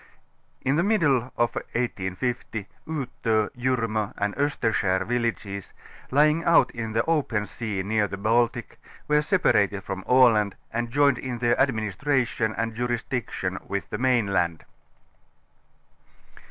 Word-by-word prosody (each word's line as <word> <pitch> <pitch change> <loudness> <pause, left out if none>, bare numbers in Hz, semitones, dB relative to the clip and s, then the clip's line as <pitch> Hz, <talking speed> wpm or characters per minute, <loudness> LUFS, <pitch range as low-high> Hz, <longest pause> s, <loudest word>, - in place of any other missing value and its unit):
Tn 135 +3 +2
the 170 - +3
middle 145 - +2
of 120 0 +1
1850 110 -1 -3 0.2
Uto. 120 -8 -1
.liirnio. 115 -4 -1
and 105 0 -1
Osterskar 110 -9 0
villages, 115 -5 -3 0.4
lying 150 +4 +3
out 170 - +4
in 115 -2 -5
the 115 +1 +1
open 140 -10 0
sea 105 -4 -4
near 105 +1 +1
the 100 +1 -6
Baltic, 115 +2 0 0.3
were 150 0 +3
separated 105 - +2
from 95 0 -5
Aland 115 -6 +4 0.2
and 120 +1 -1
joined 140 0 +3
in 125 -2 -4
their 120 0 +1
administration 120 -1 0
and 115 0 -1
jurisdiction 120 -5 -3
witli 100 -1 -3
the - - -4
mainland. 100 -10 +1
115 Hz, 120 wpm, -25 LUFS, 105-130 Hz, 0.4 s, out